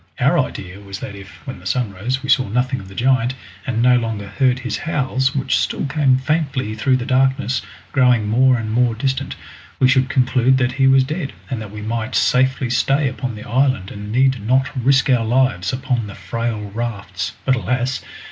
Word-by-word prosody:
Our - - +3
idea 95 +1 -4
was 100 -1 -8
that - - -7
if, 100 -1 -13
when 130 -9 -7
the 90 - -8
sun 110 0 -1
rose, 125 +8 -3
we 135 - -6
saw 130 -3 +4
nothing 125 +4 0
of 95 - -11
the 95 - -12
giant, 130 +1 +2 0.3
and 115 -2 0
no 125 0 +5
longer 110 -4 -3
heard 125 +5 +2
his 130 -4 -3
howls, 135 -3 0
which 135 -1 +1
still - - -1
came 135 -2 +2
faintly 135 -5 -1
through 130 +4 +2
the 120 - -4
darkness, 130 -2 +1 0.3
growing 125 -5 +3
more 125 +4 +4
and 110 -2 -4
more 120 0 +2
distant, 135 +2 -2 0.4
we 130 - +5
should 130 0 +3
conclude 130 0 +3
that 130 -1 +1
he 135 +1 +2
was 135 0 +5
dead, 150 +1 -4 0.2
and 120 -4 -2
that 105 - -7
we 105 +1 -8
might 115 +2 -3
safely 130 0 +2
stay 135 +3 +2
upon 125 -2 -4
the 105 - -9
island 130 -5 +1
and 105 0 -7
need 130 0 +2
not 130 +6 +1
risk 135 +2 +3
our 125 -4 +3
lives 120 -6 +1
upon 130 -4 -2
the 100 - -9
frail 115 -3 -4
rafts. 105 -5 -4
But 130 - +3
alas! 125 0 -1
125 Hz, 200 wpm, -19 LUFS, 110-130 Hz, 0.4 s, no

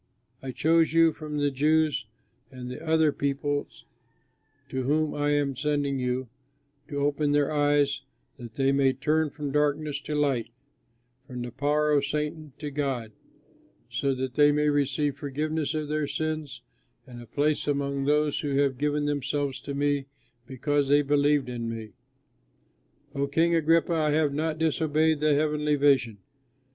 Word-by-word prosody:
I 135 - -6
chose 160 +4 +2
you 165 -1 +5
from 150 -1 -6
the 145 -1 +1
Jews 150 -3 +1 0.4
and 125 -2 -8
the 150 +5 -8
other 160 -1 +3
peoples 140 -3 -3 0.8
to 130 - -2
whom 150 +4 +1
I 145 0 0
am 145 -2 0
sending 145 0 -1
you 125 0 -2 0.6
to 145 - -7
open 145 +1 +1
their 145 +1 +2
eyes, 145 -2 +2 0.4
that 120 -4 -10
they 135 0 +2
may 135 -1 +3
turn 155 +3 +1
from 145 0 -5
darkness 150 0 0
to 150 - -4
light, 135 -6 0 0.8
from 125 -1 -6
the 120 - -6
power 145 +4 +1
of 145 -2 +3
Satan 150 +1 -3
to 150 -1 -6
God, 135 -6 -2 0.8
so 135 +3 0
that 130 -1 -4
they 145 +1 +5
may 150 0 +2
receive 145 0 0
forgiveness 150 +2 -2
of 155 -1 -2
their 150 0 -1
sins 145 -3 -4 0.4
and 120 -3 -11
a 120 - -12
place 150 +4 0
among 140 -1 -1
those 150 0 +2
who 145 -2 -2
have 135 -2 +1
given 150 0 0
themselves 145 -1 -2
to 140 - -6
me 145 -1 0 0.4
because 140 +2 0
they 145 +1 +4
believe 145 0 +2
in 120 -2 -4
me.' 110 -2 -6 1.2
O, 140 -1 -1
King 165 +4 +2
Agrippa, 165 +1 +3
I 155 -2 +1
have 150 -2 +2
not 155 +1 -1
disobeyed 160 -1 +1
the 150 -1 +3
heavenly 150 0 +1
vision. 135 -6 +2
145 Hz, 155 wpm, -27 LUFS, 135-150 Hz, 1.2 s, you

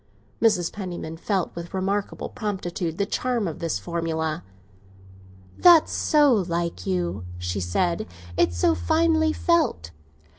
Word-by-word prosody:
Mrs. 210 -7 +2
Penniman 180 -5 -5
felt 185 +2 -2
with 170 +2 -7
remarkable 195 +2 -2
promptitude 180 -6 -3
the 200 - +1
charm 240 0 -1
of 160 - -5
this 165 -10 -1
formula. 160 +5 -2 1.2
"That's 345 -3 +7
so 295 -4 +4
like 170 - -1
you," 90 0 -1
she 90 +2 -3
said; 170 - 0 0.3
"it's 85 0 +2
so 85 - +3
finely 315 - +2
felt." 315 - +1
175 Hz, 120 wpm, -24 LUFS, 155-210 Hz, 1.2 s, That's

